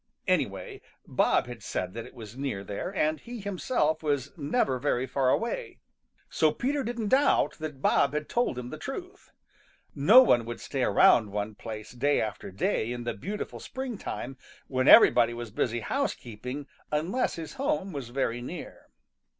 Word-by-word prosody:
Anyway - - -1 0.2
Bob - - +2
had 120 -2 -9
said 90 -3 -3
that 115 0 -6
it - - -16
was 110 -2 -10
near 130 -8 -3
there, 100 - -4
and 155 -3 +1
he 240 - -8
himself 185 -5 0
was 145 -3 -1
never 145 - 0
very 130 -2 0
far 130 0 +1
away. 345 - -1 0.5
So 155 -1 +2
Peter 280 - -1
didn't 235 -3 -3
doubt 275 -6 +3
that 150 -4 -6
Bob 140 - +3
had 150 0 -2
told 240 - 0
him 125 0 -6
the 155 - -7
truth. 360 +7 -7 0.6
No 210 - +8
one 120 - +4
would 120 0 -6
stay 135 - -4
around 105 +1 +5
one 105 +1 -3
place 110 0 -8
day 140 +4 +1
after 105 -2 -3
day 100 +4 -1
in 120 0 -4
the 120 - -2
beautiful 200 - -5
springtime, 230 - -5 0.3
when 130 0 -1
everybody 120 -1 +7
was 120 -2 -6
busy 120 +2 -1
housekeeping, 130 - -3 0.3
unless 170 +12 0
his 165 -1 -7
home 275 -9 0
was 135 -5 -5
very 120 -2 -1
near. 160 +7 -8
140 Hz, 165 wpm, -28 LUFS, 120-195 Hz, 0.6 s, No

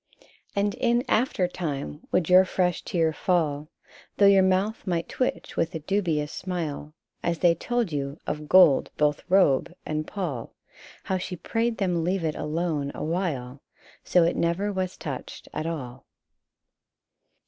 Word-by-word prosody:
And 200 0 +1
in 240 0 +1
after 215 -5 +2
time 145 - -5
would 165 - +2
your 185 +1 +7
fresh 180 -1 0
tear 165 -3 0
fall, 155 -3 0 0.5
Though 200 - +5
your 200 -1 +7
mouth 190 +4 +1
might 170 -2 -1
twitch 255 -9 -2
with 165 +1 -1
a - - -2
dubi 165 -2 0
ous 150 - -8
smile, 160 -5 -4 0.3
As 170 -1 -1
they 170 +1 +4
told 240 +3 -1
you 140 0 -3
of 150 0 -4
gold, 180 -7 +6
both 150 0 +1
robe 180 -8 +4
and 155 0 -2
pall, 160 - -4 0.5
How 190 -1 -1
she 180 0 -5
prayed 225 +6 -1
them 180 -4 0
leave 180 +1 0
it 155 -1 0
alone 150 -2 -2
awhile, 150 -6 -3 0.4
So 180 - +4
it 170 - +1
never 185 +5 0
was 185 -1 -3
touched 140 -6 -7
at 155 - -3
all. 130 -6 -6
170 Hz, 150 wpm, -26 LUFS, 150-190 Hz, 0.5 s, your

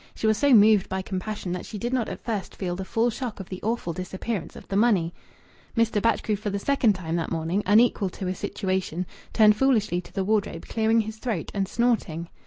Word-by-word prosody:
She - - -4
was 220 0 +4
so 285 -1 +3
moved 215 -4 +6
by 190 0 -2
compassion 190 0 -4
that 180 0 -3
she 215 - -7
did 240 +4 -3
not 245 -4 0
at - - -7
first 215 -5 -3
feel 180 -2 -3
the 190 - -4
full 230 +5 +1
shock 240 -2 -5
of 195 - -8
the 185 - -6
awful 220 -6 -2
disappearance 185 +3 -4
of - - -11
the 195 - -3
money. 195 -6 +3 0.6
Mr. 225 -2 +2
Batchgrew, 230 -1 +1
for 210 +1 -3
the 200 - -2
second 240 0 +2
time 170 -3 -3
that 165 - -2
morning 165 +4 0
unequal 210 -1 +4
to 185 +1 -6
a 185 - 0
situation, 185 -3 -2 0.3
turned 215 -2 +6
foolishly 215 -9 +2
to - - -16
the 195 - -1
wardrobe, 200 -4 -1
clearing 225 0 +2
his 220 0 -6
throat 220 - -3
and 195 -1 -1
snorting. 190 -8 0
205 Hz, 215 wpm, -25 LUFS, 185-225 Hz, 0.6 s, moved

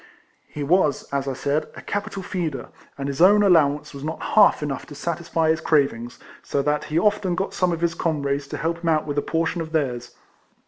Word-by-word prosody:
He 150 - -6
was, 155 -2 +2
as 140 0 -1
I 135 - -1
said, 140 +3 -1
a - - -9
capital 200 -1 -4
feeder; 165 -7 -4 0.3
and 140 -1 -4
his 140 +2 -3
own 205 +3 +7
allow 160 -7 +5
ance 150 0 -11
was 140 0 -8
not 160 +2 -4
half 210 -7 +5
enough 140 -3 -4
to 145 - -10
satisfy 165 0 -1
his 160 - -1
crav 145 -4 +3
ings, 120 +2 -9 0.2
so 140 - -1
that 150 +1 0
he 155 - -2
often 205 -1 +2
got 190 +2 -2
some 180 -1 +1
of 165 -1 -3
his 170 -1 +1
com 160 -4 -1
rades 140 0 -1
to - - -5
help 165 +1 -2
him 170 -1 -1
out 155 -1 +2
with 145 -1 -1
a - - -1
portion 165 +2 -1
of 160 0 -7
theirs. 125 -6 -2
155 Hz, 230 wpm, -23 LUFS, 140-170 Hz, 0.3 s, own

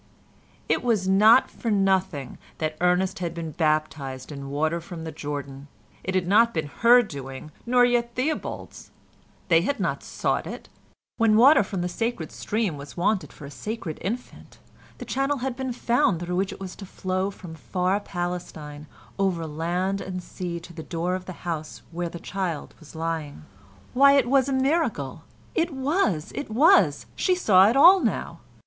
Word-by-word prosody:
It - - +1
was 220 -6 +1
not 215 +6 +6
for 230 - -4
nothing 190 - 0 0.2
that 155 -1 -2
Ernest 180 +2 +2
had 170 -2 -3
been 165 -2 -5
baptised 155 -4 -1
in 140 -1 -7
water 155 +4 -1
from 170 -1 -8
the 160 - -5
Jordan. 145 -2 -6 0.4
It 190 - -3
had 180 -2 +1
not 230 +3 +4
been 155 -3 -2
her 240 +1 +7
doing, 140 - -8 0.2
nor 245 0 +5
yet 240 -1 0
Theobald's. 295 +5 -4 0.6
They 165 -2 +5
had 280 +10 -1
not - - -1
sought - - -2
it. - - -8 0.5
When 225 -2 +4
water 275 +7 +7
from 190 -2 -3
the - - -1
sacred 200 -2 -3
stream 210 -8 -2
was 140 +3 -10
wanted 185 -4 0
for 145 - -11
a 140 - -9
sacred 200 -2 -5
infant, 235 +6 -6 0.4
the - - -8
channel 275 +2 0
had 260 0 -3
been 260 0 -3
found 235 -6 +1
through 175 +1 -3
which 190 +1 0
it - - -9
was 190 -1 -7
to 200 - -8
flow 185 +1 -2
from 185 -4 -10
far 180 +4 -1
Palestine 175 -6 -6 0.3
over 185 -4 0
land 175 +5 -2
and 185 -1 -5
sea 175 -2 -5
to 170 +1 -12
the 160 - -7
door 170 +2 -2
of 185 0 -4
the 185 - -7
house 160 -3 -4
where 170 0 -3
the 170 - -8
child 180 -3 -4
was 160 -1 -15
lying. 160 - -4 0.5
Why, 275 +2 +6
it 275 -4 +3
was 270 +1 +3
a - - 0
miracle! 280 +6 0 0.3
It 340 -5 0
was! 265 - 0
It 285 - -5
was! 300 - +4
She 370 - +2
saw 200 - +5
it 240 - +1
all 360 +7 +8
now. - - -2
185 Hz, 175 wpm, -25 LUFS, 160-235 Hz, 0.6 s, all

